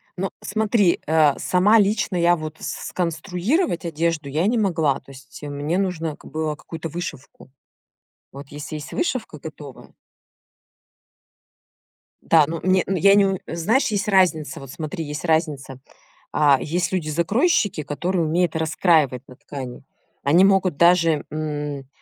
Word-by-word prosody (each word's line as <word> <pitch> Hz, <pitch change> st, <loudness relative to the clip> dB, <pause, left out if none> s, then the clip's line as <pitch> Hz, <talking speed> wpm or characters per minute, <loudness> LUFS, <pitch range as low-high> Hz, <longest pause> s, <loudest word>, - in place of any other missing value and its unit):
Но 190 Hz, +1 st, -3 dB
смотри, 215 Hz, -3 st, +1 dB
э, 155 Hz, -2 st, +3 dB
сама 195 Hz, +5 st, +3 dB
лично 205 Hz, -1 st, +1 dB
я 175 Hz, 0 st, +4 dB
вот 155 Hz, -1 st, -7 dB
с -, -, -5 dB
сконструировать 180 Hz, -, -1 dB
одежду 165 Hz, -2 st, -1 dB
я 155 Hz, +7 st, 0 dB
не 235 Hz, +2 st, +1 dB
могла. 165 Hz, -10 st, +1 dB
То -, -, -16 dB
есть, 135 Hz, 0 st, -13 dB
э, 145 Hz, -, -5 dB
мне 145 Hz, +4 st, -2 dB
нужно, 170 Hz, -5 st, -2 dB
ка -, -, -16 dB
было, 155 Hz, -1 st, -3 dB
какую-то 165 Hz, +2 st, -8 dB
вышивку. 150 Hz, -5 st, -8 dB, 0.8 s
Вот 140 Hz, +1 st, -10 dB
если 145 Hz, +1 st, -7 dB
есть 150 Hz, -1 st, -7 dB
вышивка 255 Hz, -, -2 dB
готовая. 145 Hz, -3 st, -11 dB, 2.3 s
Да, 160 Hz, -2 st, +4 dB
ну, 165 Hz, +1 st, -4 dB
не 185 Hz, -1 st, +3 dB
ну, 195 Hz, -, 0 dB
я 200 Hz, +3 st, +5 dB
не 200 Hz, -1 st, +5 dB
у 195 Hz, -1 st, 0 dB
знаешь, 210 Hz, -, +1 dB
есть 210 Hz, -3 st, -1 dB
разница, 165 Hz, -8 st, +2 dB
вот 135 Hz, -2 st, -10 dB
смотри, 160 Hz, +2 st, -5 dB
есть 150 Hz, +1 st, -6 dB
разница. 150 Hz, -5 st, -1 dB, 0.5 s
Э, 145 Hz, -2 st, +4 dB
есть 175 Hz, +4 st, -2 dB
люди-закройщики, 185 Hz, -, +1 dB
которые 170 Hz, +4 st, -1 dB
умеют 170 Hz, +1 st, 0 dB
раскраивать 160 Hz, -5 st, +2 dB
на 125 Hz, -, -13 dB
ткани. 130 Hz, -3 st, -8 dB, 0.4 s
Они 170 Hz, +7 st, +5 dB
могут 195 Hz, -4 st, +3 dB
даже, 170 Hz, -2 st, +4 dB
м, 150 Hz, -3 st, -4 dB
165 Hz, 145 wpm, -22 LUFS, 150-185 Hz, 2.3 s, я